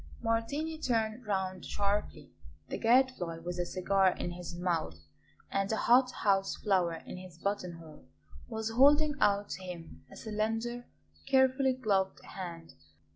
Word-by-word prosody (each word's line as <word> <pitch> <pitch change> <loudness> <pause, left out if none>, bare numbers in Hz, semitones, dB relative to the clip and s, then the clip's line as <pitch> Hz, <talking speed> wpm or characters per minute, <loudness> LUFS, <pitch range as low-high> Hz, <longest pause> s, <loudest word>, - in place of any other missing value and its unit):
Martini 280 +8 -1
turned 225 -3 -1
round 190 -2 -1
sharply. 205 +1 -2 0.4
The - - -4
Gadfly, 235 -8 +3
with 175 +2 -5
a 175 - -1
cigar 190 +1 +2
in 175 - -4
his 175 -1 -7
mouth 170 - -1 0.5
and 195 +1 0
a - - +2
hot 250 +3 +5
house 195 -5 +1
flower 185 -5 +1
in - - -7
his 185 -2 -11
buttonhole, 170 -5 -5 0.4
was 220 0 -3
holding 290 +5 +5
out 205 0 +3
to - - -5
him 175 -3 -9
a - - -11
slender, 225 +3 -2 0.4
carefully 265 0 +4
gloved 200 -7 0
hand. 170 -3 -8
200 Hz, 135 wpm, -31 LUFS, 180-240 Hz, 0.5 s, hot